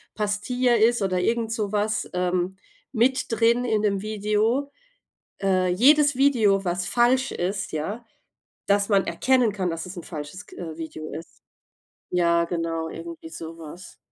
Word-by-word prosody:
Pastilla 235 +4 +1
ist 230 +1 +3
oder 185 -2 0
irgend 225 +4 0
sowas, 215 -1 -1
ähm, 180 +1 -1 0.3
mit 255 +1 +2
drin 230 +2 +3
in 220 -3 +1
'nem 200 -2 0
Video. 215 +6 0 0.7
Äh, 185 -2 +2
jedes 285 +8 +5
Video, 225 -8 +3
was 180 0 -1
falsch 250 +4 +2
ist, 195 +2 -3
ja 200 +10 -4 0.6
dass 200 0 +3
man 200 -2 +3
erkennen 255 -4 +2
kann, 190 -3 -2
dass 165 0 -4
es 180 +1 -9
'n 175 - -6
falsches 155 +5 -8
k - - -15
äh, 160 -3 -7
Video 155 -1 -7
ist. 165 +2 -10 0.7
Ja, 170 -1 +3
genau, 165 -1 -2
irgendwie 165 0 -8
sowas. 165 +1 -10
200 Hz, 145 wpm, -24 LUFS, 175-230 Hz, 0.7 s, jedes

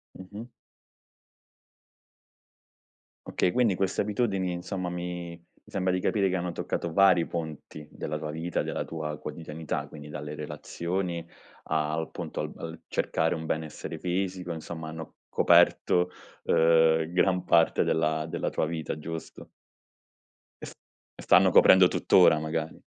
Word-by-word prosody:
Mh-mh. 100 +5 -9 2.8
Okay, 90 - +1
quindi 115 -4 +2
queste 95 +1 -1
abitudini, 100 -4 -1
insomma 90 0 -4
mi 90 -1 -5 0.3
mi - - -18
sembra 95 -1 +1
di 90 - 0
capire 100 0 +1
che 95 - 0
hanno 85 0 -3
toccato 85 -1 -3
vari 95 -3 +5
ponti 80 -2 -6
della 75 0 -4
tua 75 0 -5
vita, 80 +2 -2
della - - -3
tua 75 -2 -5
quotidianità. 80 0 -5
Quindi 75 -1 -10
dalle 75 0 -6
relazioni 85 +3 -4 0.4
al 80 +1 -1
punto - - -6
al - - -3
al 80 0 -8
cercare 80 +1 0
un 80 - -6
benessere 80 -1 -4
fisico, 90 -1 -2
insomma 80 0 -7
hanno 80 +1 -8
coperto, 90 0 +4 0.3
uhm, 80 0 +4
gran 90 0 +2
parte 85 -1 +3
della 80 -1 0
della - - -2
tua - - -1
vita, 80 -1 -4
giusto? 80 +1 -8 1.2
E - - -3
st - - -10 0.4
e - - -11
stanno - - +5
coprendo 95 -1 +7
tutt'ora 80 - +4
magari. 80 +1 -4
85 Hz, 135 wpm, -28 LUFS, 80-90 Hz, 2.8 s, coprendo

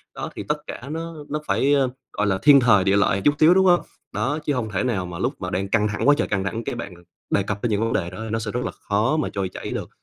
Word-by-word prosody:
Đó, - - -5
thì - - -5
tất 150 - 0
cả - - -7
nó 165 +1 -5 0.2
nó 150 - -2
phải, 140 +2 +2
ờ, 135 -3 +3 0.2
gọi 105 - 0
là, 95 -2 +1
thiên 145 -1 +7
thời, 115 -6 +4
địa 95 +1 +3
lợi 100 - +3
một - - -4
chút 145 - +4
xíu, 160 +3 +7
đúng 190 +1 +4
hông? 175 -1 +5 0.3
Đó, 135 +9 -1
chứ 145 - +1
hông 120 -5 -2
thể 95 - -1
nào 110 -8 -1
mà 90 -1 -7
lúc 125 +8 0
mà 90 - -3
đang 95 +2 -2
căng 105 0 +2
thẳng 105 +5 -2
quá 145 - +7
trời - - 0
căng 100 -2 -1
thẳng, 110 +4 -3
cái 135 - -4
bạn 110 -6 -6 0.4
đề 100 - +2
cập 100 0 -4
đến 120 - +1
những 105 0 +1
vấn 115 0 0
đề 85 - -1
đó 90 - -10
nó 110 +1 -1
sẽ 110 -1 -4
rất 125 +2 -2
là - - -2
khó 110 +9 0
mà 155 - -1
trôi 95 -2 -2
chảy - - -7
được. - - -4
115 Hz, 310 wpm, -23 LUFS, 100-145 Hz, 0.4 s, thiên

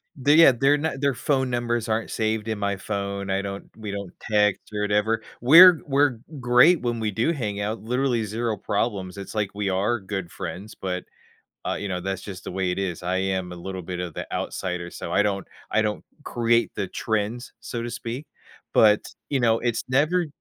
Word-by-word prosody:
They 145 +2 +3
yeah, 165 -3 +9
they're 135 +4 +3
not 150 -2 -3
their 140 -3 +2
phone 130 -2 0
numbers 120 -1 -1
aren't 110 +1 -1
saved 110 -1 -1
in 110 -2 -2
my 100 0 0
phone. 100 -1 -3
I 95 - +1
don't 100 0 -7
we 110 -2 -7
don't 100 -2 -5 0.2
text 105 -2 +3
or 105 - -2
whatever. 105 +2 +1 0.2
We're 165 +7 +9
we're 140 -3 +2 0.2
great 125 +7 +5
when 120 -2 -1
we 110 -1 0
do 110 - +1
hang 105 -9 -3
out, 105 +2 -2
literally, 125 0 0
0 110 +1 -2
problems, 100 -2 -2
it's, 100 - -7
like, 105 -3 0
we 105 -1 -1
are 100 +5 +1
good 95 -3 -5
friends, 105 +4 -7
but, 90 -1 -3 0.6
uh, - - 0
you 100 - -4
know, 90 -1 -2
that's 95 0 -3
just 95 -2 -8
the - - -5
way 95 -1 -1
it 90 - -2
is. 90 -3 -3
I 90 +1 -1
am 95 -1 -1
a - - -8
little 95 +1 -6
bit 90 +1 -5
of 90 -3 -5
the - - -6
outsider, 90 -2 -3
so 85 - -6
I - - +4
don't 100 -2 -1 0.2
I 110 - +3
don't 105 -1 -2 0.2
create 120 -3 +1
the 100 - -1
trends, 110 +5 -2
so 115 0 -5
to 120 - -4
speak. 120 +7 -5 0.5
But, 105 -1 +6 0.3
you 135 -3 +1
know, 115 -1 +3
it's 120 -2 -1
never 155 +7 +2
110 Hz, 205 wpm, -24 LUFS, 100-120 Hz, 0.6 s, yeah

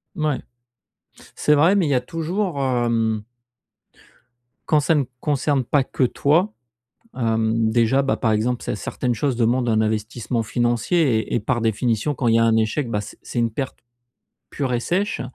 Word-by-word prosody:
Mouais. 155 -4 0 1.0
C'est 150 - +3
vrai, 165 +7 +4
mais 180 -5 +2
il - - -1
y - - +3
a 125 - +3
toujours, 165 +4 -3
hem 115 -4 0 1.5
quand 150 -2 +4
ça 160 +2 +2
ne 140 -3 +1 0.2
concerne 145 -2 +1
pas 135 +3 +2
que 130 - -1
toi, 165 - +2 0.6
hem, 110 -1 +1
déjà, 120 +4 +3
bah, 135 - 0
par 115 - 0
exemple, 120 +3 0
cer - - -3
certaines 125 -2 -2
choses 135 +3 0
demandent 120 +1 +1
un 110 -1 +2
investissement 110 +2 -2
financier 120 - 0 0.2
et - - -5
et 120 - +2
par 120 +3 -1
définition, 115 +4 0
quand 125 - -1
il 115 - +4
y - - +4
a 115 - +4
un 115 -1 +3
échec, 110 +5 0
bah 105 - 0
c - - -11
c'est 120 - -3
une 115 - +1
perte 135 +4 -4 0.7
pure 130 -4 -2
et - - +1
sèche, 195 - -1
125 Hz, 180 wpm, -22 LUFS, 115-145 Hz, 1.5 s, vrai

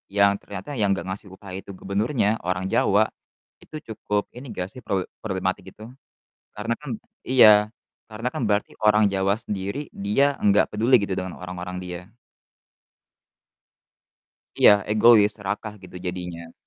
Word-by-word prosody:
yang 100 0 +5
ternyata 100 +6 -8
yang 100 -2 +2
nggak 85 -1 -4
ngasih 95 +1 -6
upah 95 -1 -11
itu 100 - -11
gubernurnya, 105 +4 0 0.2
orang 90 +1 -1
Jawa, 105 +2 +3 0.5
itu - - -13 0.2
cukup 105 -1 -1
ini 130 - -9
nggak 90 0 -3
sih 125 - -10
prowe 95 -2 0 0.2
problematik 95 -3 -2
itu? 110 - -13 0.7
Karena 110 +3 -2
kan 150 - -8 0.4
iya, 130 -4 +8 0.6
karena 110 +3 -5
kan - - -3
berarti 105 0 0
orang 105 0 +5
Jawa 95 +1 +2
sendiri, 100 +5 -4 0.3
dia 105 +7 +3 0.2
enggak 100 0 +4
peduli 115 +5 +3
gitu 95 - -2
dengan 95 -1 -5
orang-orang 90 0 -6
dia. 90 0 -7 2.5
Iya, - - +9 0.2
egois, 110 -1 +6
serakah 105 +1 -5
gitu 90 - -11
jadinya. 90 -2 -6
100 Hz, 140 wpm, -24 LUFS, 95-110 Hz, 2.5 s, Iya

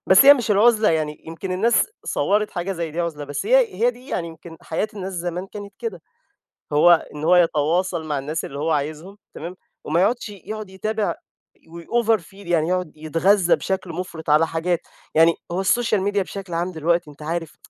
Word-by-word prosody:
بس 190 +8 +7
هي 285 - +10
مش 240 -5 -3
العُزلة 215 +1 +5
يعني 155 -2 -2
يمكن 165 +3 -5
الناس 225 +6 +3 0.2
صوَّرت 210 +1 +1
حاجة 180 +1 -3
زي 170 -3 -4
دي 165 +3 -3
عُزلة، 155 -4 -3
بس 145 - -4
هي - - +4
هي 240 +2 +2
دي 250 +2 -16
يعني 170 -2 -2
يمكن 165 0 -12
حياة 185 +6 -2
الناس 195 -2 -5
زمان 175 +1 -4
كانت 205 0 -9
كده، 210 -8 -5 0.7
هو 170 +2 +5
إن 150 - -6
هو 175 +3 +5
يتواصل 170 +1 +2
مع 145 -2 -1
الناس 150 +4 -3
اللي 140 - -7
هو 160 +2 0
عايزهم، 155 +6 -3 0.2
تمام، 170 +4 -7 0.3
وما 165 +3 +1
يقعدش 225 +3 +1
يقعد 210 +1 -7
يتابع، 215 +3 -2 0.4
ويoverfeel، 205 +3 -1
يعني 170 -2 +1
يقعد 180 -3 -1
يتغذَّى 170 +4 +3
بشكل 190 -1 -3
مُفرط 165 -3 -6
على 155 +2 +5
حاجات. 165 +2 -1 0.4
يعني 165 +1 +6 0.2
هو 180 +2 -1
السوشيال 215 +1 +2
ميديا 200 0 +1
بشكل 195 -2 -8
عام 175 +2 -1
دلوقتي 170 0 0
أنت 145 - -17
عارف، 165 +1 -4
175 Hz, 185 wpm, -22 LUFS, 160-205 Hz, 0.7 s, هي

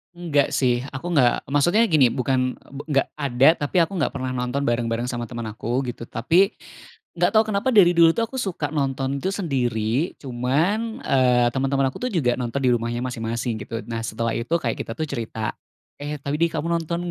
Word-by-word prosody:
Enggak 155 -5 +1
sih, 125 -2 +1
aku 130 +6 -6
enggak 125 -4 +4
maksudnya 175 +11 +3
gini, 145 - +4
bukan, 130 0 -1
e - - -24
be 140 - -6
enggak 135 -2 +2
ada 135 -3 +2 0.2
tapi 145 +5 +1
aku 170 +3 +1
enggak 160 - 0
pernah 130 -2 -4
nonton 125 +2 -2
bareng-bareng 120 0 0
sama 120 -1 -3
teman 120 -1 -6
aku, 115 +3 -2
gitu. 120 -1 -6
Tapi, 170 - +2 0.7
enggak 175 +5 +2
tahu 220 0 +6
kenapa 215 +5 0
dari 190 -5 +7
dulu 170 -1 +5
tuh 230 - 0
aku 265 - -5
suka 175 - -2
nonton 135 -2 -1
itu 190 +8 -2
sendiri 130 - -1
cuman, 160 - -1
eee, 125 -2 +3
teman-teman 135 +1 0
aku - - -10
tuh - - -2
juga 125 -8 +1
nonton 125 +2 -2
di 130 - +3
rumahnya 120 0 -1
masing-masing, 115 -1 -3
gitu. 115 0 -5
Nah, 115 -1 -5
setelah 115 +1 -2
itu 120 +8 -2
kayak 115 - -2
kita 115 - -5
tuh 140 - -5
cerita, 110 -1 -3 0.5
"Eh, 145 +1 -4
tadi 150 +4 +1
kamu 165 0 -3
nonton 170 +1 -2
135 Hz, 195 wpm, -23 LUFS, 120-165 Hz, 0.7 s, dari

